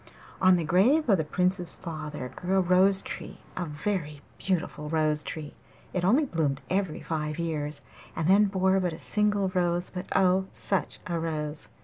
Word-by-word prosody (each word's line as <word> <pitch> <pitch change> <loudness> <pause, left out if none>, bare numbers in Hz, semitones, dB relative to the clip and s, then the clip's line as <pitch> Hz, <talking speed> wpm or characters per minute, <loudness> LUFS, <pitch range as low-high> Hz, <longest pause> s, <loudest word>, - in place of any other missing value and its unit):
On 185 -1 +6
the 170 - 0
grave 220 - +3
of 195 -4 +5
the - - +1
Prince's 180 +2 0
father 150 -6 -6
grew 185 +2 0
a - - +5
rose 190 +2 +4
tree, - - -7
a 180 - -2
very 150 -1 -3 0.2
beautiful 175 -5 -2
rose 155 -1 +1
tree. 150 -1 -6 0.4
It 180 - -1
only 250 - +4
bloomed 150 - -1
every 185 -4 0
five 150 -2 -3
years, 150 -3 -3 0.3
and 165 - -1
then 200 +3 +6
bore 190 -1 +2
but 180 -3 -1
a - - -7
single 205 -1 +1
rose, 175 -1 0
but 180 -1 -6
oh, 190 0 +3
such 195 -3 -1
a 170 -2 -2
rose! 155 -2 -4
175 Hz, 170 wpm, -28 LUFS, 155-190 Hz, 0.4 s, On